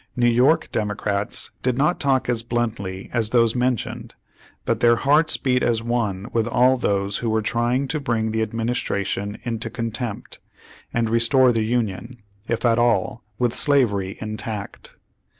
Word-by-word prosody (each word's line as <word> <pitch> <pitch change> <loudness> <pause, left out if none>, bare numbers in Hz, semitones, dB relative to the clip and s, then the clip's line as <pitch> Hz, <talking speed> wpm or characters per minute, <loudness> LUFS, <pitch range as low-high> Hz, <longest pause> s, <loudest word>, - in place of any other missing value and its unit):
New 120 -1 +2
York 125 +7 +3
Demo 105 -1 -1
crates 100 0 -3
did 125 -1 0
not 150 +6 +2
talk 135 -2 +1
as 120 -2 0
bluntly 115 -5 -3
as 115 -3 0
those 115 -1 +3
mentioned, 125 -2 -2 0.5
but - - 0
their 120 0 +5
hearts 150 +6 +3
beat 125 -1 +1
as 115 -1 +1
one 110 -5 -1
with 115 -1 +1
all 125 +2 +4
those 100 -5 0
who 115 - -2
were 110 0 0
trying 120 +5 0
to 155 - -1
bring 115 -5 -1
the 110 0 -1
administration 110 -2 -2
into 115 -2 -3
con 115 0 -4
tempt, 115 -2 -6 0.5
and 115 -1 0
restore 115 +3 +4
the 115 -2 0
Union, 115 +1 -2 0.3
if 115 +1 -1
at 115 -1 +3
all, 120 +1 +1
with 120 -2 0
slavery 105 -10 +2
intact. 110 -1 -6
115 Hz, 160 wpm, -22 LUFS, 110-125 Hz, 0.5 s, their